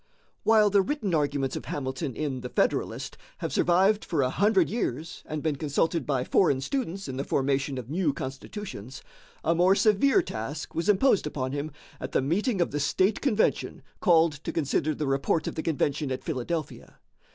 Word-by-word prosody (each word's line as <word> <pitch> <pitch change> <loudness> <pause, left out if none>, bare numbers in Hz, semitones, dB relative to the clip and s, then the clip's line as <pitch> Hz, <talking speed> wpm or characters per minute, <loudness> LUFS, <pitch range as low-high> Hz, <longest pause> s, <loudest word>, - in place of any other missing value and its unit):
While 215 -2 +4
the 200 0 +5
written 205 - -2
arguments 145 -3 0
of - - -5
Hamilton 130 -1 -4
in 140 -4 -3
"The 125 - -6
Federalist" - - -1 0.2
have - - -4
survived 190 +5 +3
for 155 -5 0
a 130 - 0
hundred 200 -2 +3
years 165 - -3
and 155 -1 -4
been 155 -3 0
consulted 155 +1 0
by 135 -4 +1
foreign 140 -2 +3
students 195 - -3
in 130 -1 -5
the 135 - -1
formation 140 0 0
of 125 -3 -6
new 160 +2 +1
constitutions, 135 - -7 0.4
a 165 - +3
more 180 +3 +4
severe 215 +7 +4
task 135 +8 -5
was 165 +4 -1
imposed 205 - +4
upon 130 -3 -3
him 145 +2 -3 0.3
at - - -6
the - - +3
meeting 195 - 0
of 175 - +1
the 145 - -2
state 185 +8 +1
convention 225 -6 0 0.2
called 165 -4 +4
to - - -3
consider 155 0 0
the 150 - -2
report 135 +4 0
of - - -3
the 160 - -3
convention 150 -3 -1
at 130 - -3
Philadelphia. 155 +1 -4
155 Hz, 180 wpm, -27 LUFS, 135-190 Hz, 0.4 s, the